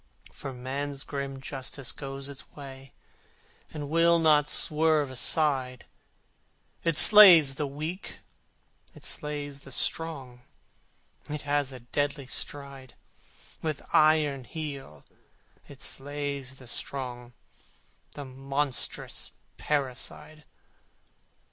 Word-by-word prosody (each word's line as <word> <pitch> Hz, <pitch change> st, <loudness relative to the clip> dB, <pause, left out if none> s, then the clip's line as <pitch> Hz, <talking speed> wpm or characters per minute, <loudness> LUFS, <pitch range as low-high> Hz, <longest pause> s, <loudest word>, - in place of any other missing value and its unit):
For 135 Hz, -, -7 dB
Man's 135 Hz, +2 st, -5 dB
grim 140 Hz, -1 st, -5 dB
Justice 135 Hz, -1 st, -4 dB
goes 135 Hz, -1 st, -6 dB
its 140 Hz, -3 st, -9 dB
way 135 Hz, -2 st, -11 dB, 0.8 s
And 150 Hz, -2 st, -6 dB
will 165 Hz, +2 st, +4 dB
not 155 Hz, -3 st, +4 dB
swerve 155 Hz, -3 st, +2 dB
aside: 130 Hz, -2 st, +1 dB, 1.0 s
It 165 Hz, -3 st, +1 dB
slays 175 Hz, -11 st, +10 dB
the 145 Hz, +1 st, -3 dB
weak, 155 Hz, +7 st, -6 dB, 0.8 s
it -, -, -14 dB
slays 145 Hz, -2 st, -4 dB
the 135 Hz, -, -12 dB
strong, 135 Hz, -4 st, -2 dB, 0.9 s
It 150 Hz, 0 st, -3 dB
has 145 Hz, -1 st, 0 dB
a 130 Hz, -2 st, -9 dB
deadly 145 Hz, +3 st, -2 dB
stride: 140 Hz, -1 st, -6 dB, 0.7 s
With 155 Hz, -3 st, -3 dB
iron 150 Hz, -4 st, +4 dB
heel 140 Hz, -, -7 dB, 0.6 s
it 140 Hz, -2 st, -13 dB
slays 140 Hz, -1 st, -4 dB
the 130 Hz, -, -12 dB
strong 125 Hz, -1 st, -4 dB, 0.8 s
The 145 Hz, -, -7 dB
monstrous 135 Hz, +1 st, -2 dB, 0.3 s
parricide! 150 Hz, +2 st, -3 dB
140 Hz, 100 wpm, -28 LUFS, 135-150 Hz, 1.0 s, slays